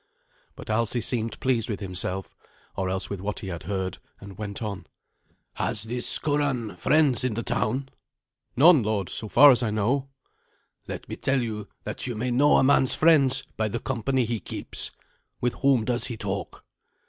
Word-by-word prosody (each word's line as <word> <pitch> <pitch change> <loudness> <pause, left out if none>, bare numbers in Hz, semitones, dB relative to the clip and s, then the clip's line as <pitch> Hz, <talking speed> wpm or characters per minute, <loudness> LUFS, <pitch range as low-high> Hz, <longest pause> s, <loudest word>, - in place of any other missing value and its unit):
But - - -7
Alsi 115 +2 +1
seemed 115 0 -2
pleased 120 -4 0
with 105 - -3
himself, 95 0 -4 0.4
or 95 -1 -1
else 95 +1 -2
with 100 -2 -4
what 105 +1 -4
he 95 - -5
had 85 -2 -5
heard, 95 -2 -2 0.2
and 100 -1 -11
went 100 -1 -6
on. 100 -3 -5 0.7
"Has 105 - -2
this 120 +2 -1
Curan 145 -7 -1
friends 150 -5 +3
in 125 -4 0
the 115 - -2
town?" 130 +3 -1 0.7
"None, 155 +2 +7
lord, 105 -3 -1
so 110 - -6
far 140 +7 +8
as 125 - +3
I 115 - 0
know." 120 +6 0 0.8
"Let - - -6
me - - -6
tell 135 -2 +1
you 105 -3 -5 0.2
that - - -5
you 120 - -3
may 125 +3 -2
know 140 +5 +5
a - - +4
man's 130 -1 +3
friends 150 -5 +4
by 110 0 +1
the 110 +3 -3
company 130 +1 0
he 115 0 -2
keeps. - - -3 0.5
With 120 -1 0
whom 135 -5 +3
does 120 0 0
he 120 - -5
talk?" 100 -1 -5
115 Hz, 180 wpm, -26 LUFS, 105-130 Hz, 0.8 s, far